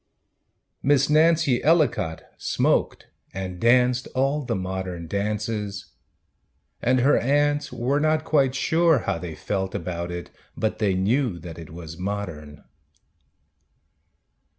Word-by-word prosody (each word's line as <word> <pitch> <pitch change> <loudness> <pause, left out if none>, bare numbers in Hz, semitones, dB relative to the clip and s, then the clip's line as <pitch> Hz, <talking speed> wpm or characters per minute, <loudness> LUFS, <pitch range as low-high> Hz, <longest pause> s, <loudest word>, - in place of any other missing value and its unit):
Miss 140 0 +3
Nancy 155 -5 +3
Ellicott 145 - +2 0.2
smoked - - 0 0.3
And 95 -2 -5
danced 125 +2 +3
all 135 +3 +1
the 125 - -2
modern 95 -2 -4
dances; 105 +2 -3 0.9
And 125 +1 +2
her 140 +4 +4
aunts 145 +3 +1
were 125 +4 0
not 155 +1 +1
quite 135 -5 +2
sure 160 +3 +3
how 85 - -1
they 85 -2 -6
felt 95 +1 -3
about 85 -1 -4
it, 90 0 -6 0.3
But 110 0 -1
they 100 -3 +1
knew 110 +2 +1
that 85 -1 -9
it 80 - -10
was 80 0 -9
modern. 90 -7 -5
110 Hz, 120 wpm, -24 LUFS, 90-140 Hz, 0.9 s, her